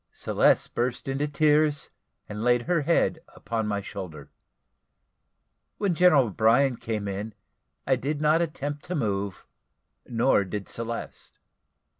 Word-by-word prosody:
Celeste - - +1
burst 125 +2 -2
into 135 +2 -1
tears, 150 0 +2 0.4
and 105 0 -6
laid 120 0 +3
her 170 +1 +1
head 165 +1 +1 0.2
upon 115 -2 -3
my 100 -1 -1
shoulder. 95 -5 -8 1.5
When 200 -4 0
General 165 -5 +5
O'Brien 115 +5 +3
came 105 -3 -4
in, 100 +2 -5 0.5
I - - +2
did 145 +2 -3
not 155 +2 +3
attempt 145 -3 -4
to 180 - -3
move, 100 - -2 0.6
nor 115 -3 +2
did 100 +1 -5
Celeste. 115 0 -6
125 Hz, 125 wpm, -26 LUFS, 105-150 Hz, 1.5 s, General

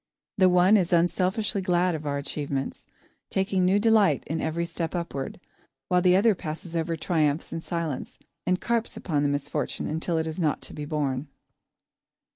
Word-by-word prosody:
The 185 -1 +6
one 180 +4 +6
is 180 -3 0
unselfishly 185 +4 +1
glad 180 -1 +2
of 155 -2 -4
our 140 0 0
achievements, 140 -1 -4 0.4
taking 190 -1 +1
new 185 +2 +4
delight 205 - +4
in 160 +1 -2
every 165 +2 -1
step 170 -1 -4
upward, 155 -6 -4 0.5
while 180 0 +4
the 180 0 +5
other 210 +3 +5
passes 165 -1 -6
over 165 0 0
triumphs 155 -2 0
in 165 - -3
silence 165 -6 -4 0.3
and 180 0 +2
carps 235 -1 -1
upon 150 -5 -1
the 145 - +2
misfortune 145 0 -2
until 160 +2 -1
it 160 - 0
is 160 +2 -5
not 155 -4 +1
to - - -7
be 150 - -5
borne. 145 -2 -2
170 Hz, 170 wpm, -26 LUFS, 150-185 Hz, 0.5 s, The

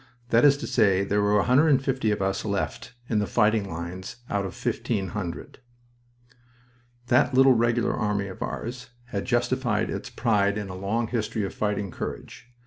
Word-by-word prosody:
That 115 0 +4
is 140 -1 +6
to - - -6
say, 100 -5 +3
there 100 +1 +1
are 105 0 +2
150 130 +1 +3
of 105 -1 0
us 95 0 -1
left 100 +4 -3
in 110 - +1
the 105 - -1
fighting 105 -3 +2
lines 90 +6 -6 0.2
out 100 -1 0
of 85 - -9
1,500." 95 -5 -3 1.5
That 130 +2 +3
little 135 0 +7
Regular 120 0 +1
Army 105 -2 -1
of 95 -2 -9
ours 125 +2 -5 0.2
had 100 -4 -3
justified 120 -2 0
its - - -5
pride 100 -3 +1
in 105 -2 -4
a 90 - -6
long 110 +5 -2
history 110 -2 -2
of 95 - -4
fighting 105 -2 -2
courage. 120 - -7
105 Hz, 160 wpm, -26 LUFS, 100-120 Hz, 1.5 s, little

